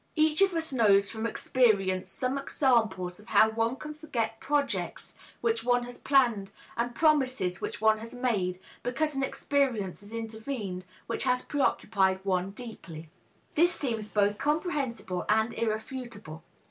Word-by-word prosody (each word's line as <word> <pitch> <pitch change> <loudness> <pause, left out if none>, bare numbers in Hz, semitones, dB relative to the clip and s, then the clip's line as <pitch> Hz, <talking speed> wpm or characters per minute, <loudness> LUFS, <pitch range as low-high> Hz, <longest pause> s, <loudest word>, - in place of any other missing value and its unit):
Each 310 +1 +3
of 385 -3 +4
us 320 -3 +1
knows 200 -5 +4
from 220 +2 -2
experience 195 -8 +1
some 255 +7 -2
examples 220 -10 +1
of 210 - -16
how 220 0 +5
one 225 +2 0
can 300 +2 -7
forget 235 -8 -3
projects 285 -1 -1 0.3
which 230 -1 0
one 245 0 +2
has 245 0 -9
planned 235 -8 +3 0.3
and 240 +1 -2
promises 260 - +2
which - - -4
one 220 0 +4
has 230 +1 -8
made, 210 -8 -1 0.2
because 300 +5 -1
an 270 - -2
experience 265 -8 0
has 205 +1 -13
intervened 220 -4 -5 0.2
which 230 - -2
has 250 -1 +2
preoccupied 195 -9 +1
one 185 -1 0
deeply. 190 -8 -9 0.4
This 345 +3 +4
seems 225 -8 -2
both 205 0 +1
comprehensible 285 - -1
and 220 +2 +2
irrefutable. 220 -6 -4
230 Hz, 145 wpm, -29 LUFS, 205-270 Hz, 0.4 s, how